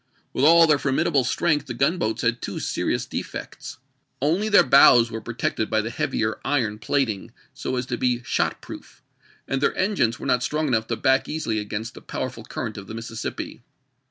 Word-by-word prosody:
With 130 - -1
all 165 +1 +7
their 150 -3 +3
formidable 140 +1 +1
strength 145 +3 0
the 120 - -5
gunboats 140 -3 0
had 120 0 +1
two - - -4
serious - - -1
defects. - - -7 0.4
Only 170 +10 +1
their 205 - +7
bows 120 -3 +6
were 115 -1 -5
protected 110 -1 -2
by 110 0 +2
the 115 +2 -5
heavier 110 -1 -1
iron 115 -7 0
plating 110 -3 -1 0.2
so 130 - -4
as 125 0 -2
to 125 -1 -3
be 125 -1 0
shot - - -1
proof, - - -11 0.4
and 135 0 -1
their - - +1
engines 185 - +1
were - - -7
not 125 -2 +2
strong 150 +4 -1
enough 110 -4 0
to - - -1
back 130 0 +2
easily 150 -9 -2
against 105 +4 -5
the - - -12
powerful 130 -3 -5
current 110 0 -5
of 100 - -11
the 110 - -7
Mississippi. 115 0 -6
125 Hz, 185 wpm, -24 LUFS, 115-145 Hz, 0.4 s, all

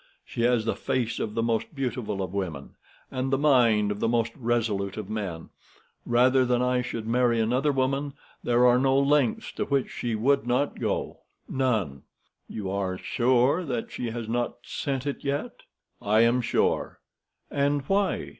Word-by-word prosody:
She - - -5
has 120 -2 +2
the - - 0
face 120 -3 -2
of 105 - -3
the 115 - 0
most 115 +6 -1
beautiful 120 -7 -2
of 95 0 -6
women 85 -8 -4 0.4
and 130 0 -2
the 135 - +2
mind 120 -8 +4
of 105 - -4
the - - +1
most 115 0 +1
resolute 110 -6 -1
of 105 -1 -6
men. 95 -7 -4 0.6
Rather 125 +2 +4
than 125 -1 +1
I 125 0 +1
should 115 -2 -5
marry 120 0 +2
another 125 +6 +2
woman, 135 +1 -1 0.3
there 120 +1 +3
are 125 0 +5
no 135 0 +3
lengths 140 -3 +2
to - - -3
which 140 -2 0
she 120 -2 -3
would 125 +2 +2
not 130 +4 0
go—none." 110 - -2 0.5
"You 95 -3 -4
are 95 -2 -2
sure 130 - +2 0.2
she 120 - -4
has 115 -1 -5
not 120 +1 -1
sent 135 -3 -3
it 140 - -4
yet?" 140 0 -3 0.4
"I 105 +2 +3
am 120 +2 +3
sure." 120 0 0 0.5
"And 140 0 +1
why?" 195 +6 0
120 Hz, 165 wpm, -26 LUFS, 110-135 Hz, 0.6 s, are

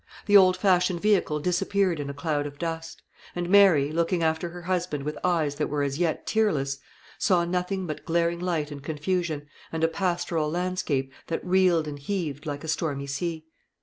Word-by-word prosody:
The 205 - +3
old 185 -2 +7
fashioned 180 -2 +2
vehicle 185 -6 +2
disappeared 180 +1 +1
in 140 -1 -4
a - - -4
cloud 145 0 -1
of 145 0 -10
dust; 165 0 -5 0.3
and 175 0 -2
Mary, 180 -7 +5
looking 170 +2 0
after 160 +2 0
her 175 +1 -9
husband 175 -5 -1
with 150 +1 -3
eyes 165 -5 +1
that 150 - 0
were 145 0 0
as 140 +2 -2
yet 170 -3 0
tearless, 145 -12 +1 0.4
saw 175 -2 +3
nothing 180 +2 -1
but 155 -3 -5
glaring 170 0 +1
light 165 -4 -1
and 145 -1 -7
confusion, 155 +1 -2 0.3
and 160 0 -2
a - - +6
pastoral 170 -3 -1
landscape 170 -6 -1
that 165 - -3
reeled 180 -3 +3
and 145 -1 -6
heaved 155 -3 -3
like 145 0 -4
a - - -6
stormy 150 -3 -1
sea. 160 +3 -3
165 Hz, 180 wpm, -26 LUFS, 150-180 Hz, 0.4 s, old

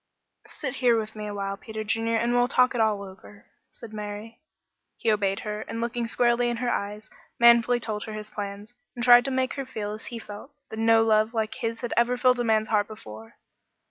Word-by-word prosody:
"Sit 275 -3 -6
here 240 -3 +3
with 220 0 -6
me 210 -1 -5
awhile, 200 -1 -3
Peter 220 0 -6
Junior, 225 +1 0
and 235 +2 +1
we'll 245 0 +3
talk 250 0 +3
it 240 - 0
all 210 -2 +1
over," 195 +1 -13 0.2
said 225 -2 -11
Mary. 210 +2 -7 0.6
He 225 - +1
obeyed 200 -2 0
her, 210 0 -4
and 230 - -6
looking 235 0 -2
squarely 240 +1 +2
in 240 - -2
her 240 0 -1
eyes, 210 +1 -4 0.3
manfully 235 +1 +6
told 215 -3 -4
her 220 - -7
his 215 0 -7
plans, 205 +2 -6 0.2
and 240 - -4
tried 245 0 +7
to - - -1
make 260 -1 0
her 275 - -2
feel 210 -5 -4
as 215 - -8
he 240 - -6
felt, 210 +3 -9 0.2
that 220 - -6
no 225 0 +5
love 220 +1 +2
like 220 -1 -1
his 230 0 -4
had 240 - -3
ever 240 +1 +2
filled 250 0 +3
a - - +1
man's 220 -1 +1
heart 205 -2 +2
before. 110 - -11
225 Hz, 215 wpm, -26 LUFS, 210-240 Hz, 0.6 s, tried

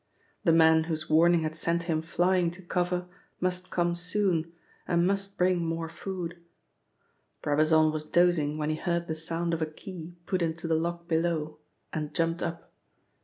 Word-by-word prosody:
The 170 - +4
man 160 -1 +5
whose 155 -2 -3
warning 170 +1 +5
had 155 0 -2
sent 170 +1 0
him 160 -2 0
flying 175 +2 +2
to 190 - -13
cover 180 0 -1 0.3
must 180 0 -1
come 175 -1 +1
soon, 175 -2 0 0.4
and 170 0 +2
must 195 +1 -1
bring 180 -1 +2
more 165 0 -2
food. 175 0 -5 1.0
Brabazon 155 +1 +4
was 155 0 -3
dozing 160 -3 +2
when 155 0 -1
he 155 - -2
heard 170 +1 -1
the 160 - -3
sound 165 +2 -2
of 165 - -1
a 160 - +1
key 170 +1 -9
put 185 0 -1
into 165 0 -2
the 165 - +1
lock 170 +1 -1
below 160 -2 0 0.3
and 150 -1 -4
jumped 165 +1 0
up. 165 0 -5
170 Hz, 170 wpm, -28 LUFS, 160-175 Hz, 1.0 s, man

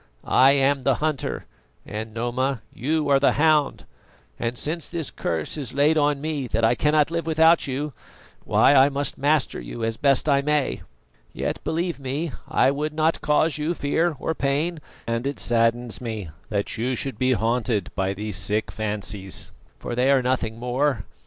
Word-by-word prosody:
I 135 +2 +5
am 140 0 +2
the 130 0 +2
hunter 155 -1 -2 0.4
and, 110 +1 -6
Noma, 120 +2 -2
you 150 +4 -1
are 140 -1 +5
the 140 - +3
hound; 150 -1 +2 0.5
and 115 +1 -2
since 160 +4 -4
this 165 -4 -3
curse 80 - -3
is 135 -3 -5
on 145 0 +3
me 150 -3 -3
that 115 0 -1
I 115 +1 +5
cannot 150 +3 +2
live 170 -1 -2
without 160 0 +4
you, 140 +2 -3 0.5
why - - +4
I 135 0 +6
must 140 -1 -3
master 145 - +1
you - - -7
as 115 0 -1
best 140 +2 +2
I 140 -2 +4
may. 150 -1 0 0.5
Yet, - - -3
believe 170 0 -2
me, 140 +4 -3 0.2
I 130 - +3
would 150 +2 -3
not 160 +1 +1
cause 150 +1 +2
you 160 +4 -1
fear 160 +3 0
or 160 - -2
pain, 155 +4 -1 0.3
and 115 +3 -2
it 140 - -4
saddens 120 0 +1
me 110 -8 -5 0.2
that 100 0 -2
you 125 +3 0
should 135 +2 -4
be 130 0 +3
haunted 115 -4 0
by 95 0 -1
these 105 -1 -4
sick 105 +3 0
fancies, 105 -3 -3 0.3
for - - -6
they 125 +3 +2
are 135 -2 +4
nothing 125 -3 -1
more. 125 -1 -1
135 Hz, 170 wpm, -24 LUFS, 115-150 Hz, 0.5 s, I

